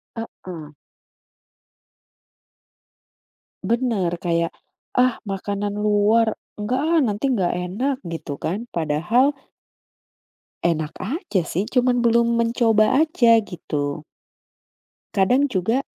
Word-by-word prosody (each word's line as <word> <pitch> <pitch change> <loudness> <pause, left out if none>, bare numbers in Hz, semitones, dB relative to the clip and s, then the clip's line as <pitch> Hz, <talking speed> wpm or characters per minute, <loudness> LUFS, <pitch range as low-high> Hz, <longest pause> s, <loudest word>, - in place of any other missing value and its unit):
Heeh. 175 -9 -8 2.9
Benar, 215 -5 0
kayak 170 -1 0 0.4
"Ah, 250 -1 +3
makanan 200 +1 -3
luar, 210 +2 +3 0.2
enggak, 230 +5 -1
ah, 325 +2 +2
nanti 215 +3 0
enggak 195 -10 +1
enak" 260 +8 -1
gitu 165 -3 -6
kan, 200 +8 -2
padahal 175 - +1 1.3
enak 160 -2 -1
aja 230 - -1
sih 185 +5 -1
cuman 245 -1 +2
belum 235 0 +3
mencoba 230 +1 +3
aja, 260 -8 +4
gitu. 150 -7 -4 1.1
Kadang 250 +9 +3
juga, 225 +6 0
215 Hz, 90 wpm, -22 LUFS, 180-245 Hz, 2.9 s, aja